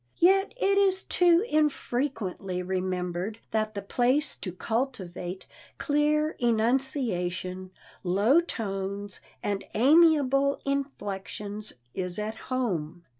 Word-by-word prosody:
Yet 390 +5 +4
it 395 -4 +3
is 385 -1 +3
too 350 +2 +4
infrequently 240 - -1
remembered 185 +2 -2
that 215 -1 -1
the 200 - -4
place 250 +8 +1
to 185 - -5
cultivate 185 -4 -3 0.3
clear 300 +1 +2
enunciation, 220 -7 0 0.3
low 200 - +4
tones 200 - -4 0.2
and 200 -1 -1
amiable 280 +1 +5
inflections 210 -6 -4 0.2
is 180 -2 -3
at 210 +1 -2 0.2
home. 180 -11 -2
220 Hz, 95 wpm, -28 LUFS, 190-280 Hz, 0.3 s, amiable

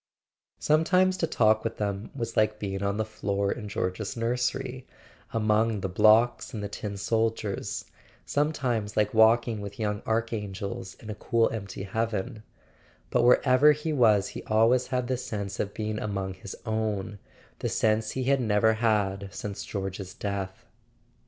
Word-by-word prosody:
Sometimes 180 +5 +3
to 165 - 0
talk 110 -4 +3
with - - -3
them 100 0 -3
was 115 -3 -4
like 110 0 +2
being 95 -2 -4
on 100 0 0
the 110 - 0
floor 100 -2 -1
in 105 -4 -5
George's 100 +5 -3
nursery, 125 +2 -2 0.4
among 110 -1 +1
the 95 - -1
blocks 110 +6 +4
and 105 - -4
the - - -2
tin 100 0 -5
soldiers; 110 0 -1 0.4
sometimes 125 -8 -1
like 105 -1 +2
walking 110 0 +4
with 100 +1 -8
young 105 -1 -1
archangels 105 -4 -3
in 110 - -9
a - - -3
cool 115 +2 +1
empty 100 -3 -5
heaven; 110 +2 -2 0.7
but 125 - +3
wherever 130 +4 +6
he 150 +2 -3
was 110 -7 +4
he - - -7
always 115 +4 +3
had 125 -1 -1
the 130 0 0
sense 100 -6 -5
of 100 - -1
being 110 0 -3
among 95 -2 -3
his 95 +1 -9
own, 110 -2 -2 0.4
the - - -1
sense 110 0 +1
he 130 - -2
had 135 +1 +2
never 110 -1 +3
had 100 -3 0
since 100 +1 -5
George's 95 -2 -5
death. 100 -2 -4
110 Hz, 155 wpm, -27 LUFS, 100-120 Hz, 0.7 s, wherever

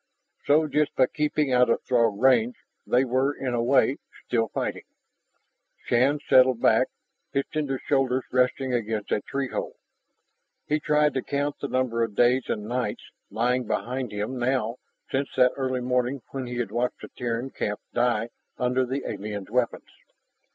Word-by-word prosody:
So 155 +2 +4
just 150 0 0
by 130 - +5
keeping 150 0 0
out 125 -1 +4
of - - +1
Throg 115 -5 +2
range, 125 -2 +4 0.3
they 125 +2 +3
were, 130 +3 +1
in 130 -2 -3
a 120 - +1
way, 135 +2 +3 0.3
still 115 -2 +1
fighting. - - -4 1.0
Shann 130 +5 +3
settled 130 -2 +5
back, - - +4 0.5
his 140 - +1
tender 145 -4 -1
shoulders 130 -2 +1
resting 130 +1 +1
against 110 -3 -2
a - - +1
tree 135 +2 -3
hole. - - -4 0.9
He 150 +1 0
tried 150 0 +2
to 130 - -1
count 145 +1 -2
the 140 - -3
number 130 -3 0
of 115 -3 -1
days 125 +2 +3
and 105 - -2
nights 120 -1 -3 0.2
lying 125 +1 0
behind 125 +3 -2
him 105 +5 -3
now 120 -2 0 0.3
since 135 +1 0
that 125 -1 +5
early 130 -2 -1
morning 125 +1 0
when 135 -2 -4
he 120 0 -5
had 120 -4 -2
watched 120 +2 -1
the - - -9
Terran 120 +2 -3
camp 105 0 -3
die 120 -2 +1 0.3
under 125 0 +1
the 135 +3 -3
aliens' 105 -1 -5
weapons. 125 0 -1
125 Hz, 165 wpm, -26 LUFS, 120-135 Hz, 1.0 s, by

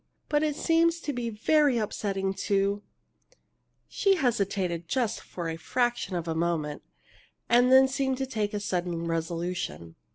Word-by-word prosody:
But 295 0 +2
it 305 -2 0
seems 335 +1 +2
to 290 - -3
be 240 -2 -3
very 275 +5 +3
upsetting 195 -3 -2 0.2
to 200 0 +2 0.5
" - - -43 0.3
She 395 -1 +2
hesitated, 200 - -1
just 240 +1 0
a 165 -2 -5
fraction 240 0 -1
of 170 -1 -3
a 165 - 0
moment, 160 -3 -1 0.7
and 245 +2 +4
then 265 0 +8
seemed 265 -1 -1
to 265 - -1
take 215 -5 -2
a - - -1
sudden 175 -4 -2
resolution. 165 - -3
205 Hz, 150 wpm, -28 LUFS, 175-265 Hz, 0.7 s, then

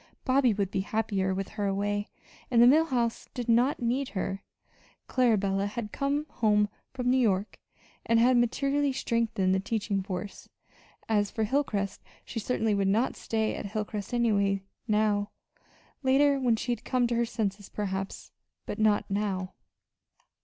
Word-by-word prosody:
Bobby 260 -2 +4
would 200 -2 -1
be - - -1
happier 195 -1 -1
with 190 0 -3
her 205 -2 -2
away, 205 +1 -1 0.4
and 240 - +3
the 240 - +8
Mill 305 +6 +6
House 240 -6 -1
did 245 -2 -4
not 245 +3 +3
need 255 +3 0
her 195 +1 -2 0.7
Clarabella 205 -6 +2
had 210 0 -5
come 285 +2 -1
from 210 -2 +4 0.4
New 260 - +3
York, 205 -4 0 0.5
and 230 0 +4
had 250 +2 +5
materially 275 +4 +1
strengthened 230 -6 0
the 190 - +2
teaching 200 -1 -1
force. 190 +1 -6 0.6
As 205 -2 +2
for 220 - -2
Hilcrest 210 -6 -1 0.3
she 230 - -5
certainly 225 -1 0
would 200 -1 +1
not 220 +6 +1
stay 220 -1 -1
at - - -5
Hilcrest 210 -1 -4
anyway 200 -5 +1 0.2
now. 210 -1 +1 0.7
Later, 280 +1 +4
when 245 -3 +2
she 240 +2 -3
had 240 - -3
come 250 -2 +1
to 235 0 0
her 235 0 +2
senses, 205 -4 -3
perhaps 195 -2 -4 0.3
but - - -5
not 215 -1 +3
now. 195 -2 -2
220 Hz, 155 wpm, -28 LUFS, 200-245 Hz, 0.7 s, the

